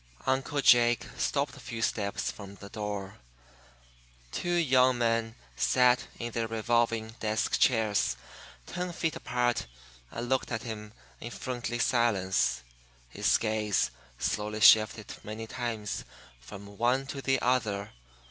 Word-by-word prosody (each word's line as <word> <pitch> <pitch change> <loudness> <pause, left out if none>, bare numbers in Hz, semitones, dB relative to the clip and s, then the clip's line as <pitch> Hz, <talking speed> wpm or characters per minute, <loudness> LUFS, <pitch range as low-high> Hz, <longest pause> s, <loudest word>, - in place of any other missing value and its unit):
Uncle 135 +2 0
Jake 120 -2 +5
stopped 140 -1 -1
a - - -12
few 115 -3 -5
steps 105 -1 -1
from 100 -1 -10
the 100 0 -11
door. 105 -2 -5 1.1
Two 175 - -3
young 130 -6 +4
men 115 -1 0 0.2
sat 125 - +3
in 120 0 -4
their 115 0 -1
revolving 115 0 +1
desk 110 0 0
chairs 110 -5 +2 0.5
ten 180 0 -4
feet 160 -1 -1
apart 120 - -1 0.4
and 120 - -5
looked 130 0 0
at 115 -2 -2
him 105 -2 -7 0.3
in 120 - -6
friendly 120 -1 -4
silence. 105 - +1 0.5
His - - +2
gaze 110 -2 0 0.3
slowly 105 - -2
shifted 110 0 +6
many 110 +1 -6
times 115 -3 -4 0.4
from 100 +11 -11
one 125 +3 +2
to 135 0 -6
the 135 0 +1
other. 110 -5 0
115 Hz, 130 wpm, -29 LUFS, 105-125 Hz, 1.1 s, shifted